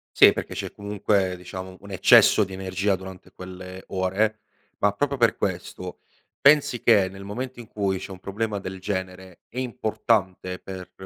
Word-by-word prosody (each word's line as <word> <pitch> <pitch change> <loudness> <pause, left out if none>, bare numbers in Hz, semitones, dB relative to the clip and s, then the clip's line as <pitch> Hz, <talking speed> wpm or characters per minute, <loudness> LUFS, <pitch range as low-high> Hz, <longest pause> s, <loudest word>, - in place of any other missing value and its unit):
Sì, - - +8
perché - - -5
c'è - - -4
comunque, 100 -2 0
diciamo, 95 +1 -8
un 100 - -13
eccesso 95 +3 +6
di 95 - -7
energia 95 +1 -1
durante 95 -1 -11
quelle 95 0 -9
ore; 100 +4 0 0.4
ma 105 - +3
proprio 140 +7 -1
per 115 -4 +3
questo 90 -1 -4 0.4
pensi 140 -5 +5
che 105 -5 +5
nel 95 +1 -10
momento 125 +5 -5
in 115 - -13
cui 100 -3 -1
c'è 95 - -8
un 95 - -9
problema 105 +2 -3
del 95 0 -7
genere 95 -2 -5
è 125 - -6
importante 110 -6 -1
per 95 -1 -9
95 Hz, 165 wpm, -25 LUFS, 95-105 Hz, 0.4 s, Sì